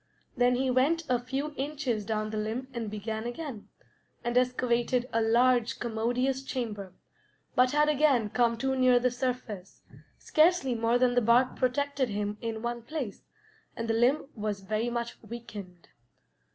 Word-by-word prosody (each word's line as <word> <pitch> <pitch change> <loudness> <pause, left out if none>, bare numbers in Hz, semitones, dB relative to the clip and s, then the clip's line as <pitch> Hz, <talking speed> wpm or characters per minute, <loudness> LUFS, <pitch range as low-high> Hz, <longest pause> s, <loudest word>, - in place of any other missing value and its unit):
Then 245 -1 +3
he 260 +1 +1
went 290 +7 +2
a 250 -1 +3
few 270 +5 -3
inches 270 -6 -2
down 215 0 -2
the 215 - -3
limb 225 +5 -3
and 230 -3 -3
began 220 +2 -4
again, 245 -3 -6 0.5
and 240 0 -2
excavated 250 0 +1
a 230 - +2
large, 240 +1 +3
commodious 245 +3 0
chamber, 220 -8 -5 0.6
but 250 0 +4
had 295 +2 +3
again 280 -8 +3
come 235 -1 +2
too 265 +2 0
near 255 -1 +5
the 250 +1 +2
surface; 245 -6 -4 0.3
scarcely 310 -5 +3
more 230 +1 +2
than 245 0 +3
the 245 - +3
bark 240 +3 +4
protected 270 0 0
him 205 0 -3
in 225 -1 -4
one 240 0 -2
place, 250 -4 -6 0.5
and 230 - -4
the 225 - +1
limb 255 +6 +2
was 210 -2 -3
very 215 +4 -1
much 235 0 -4
weakened. 205 -7 -9
240 Hz, 155 wpm, -29 LUFS, 225-260 Hz, 0.6 s, near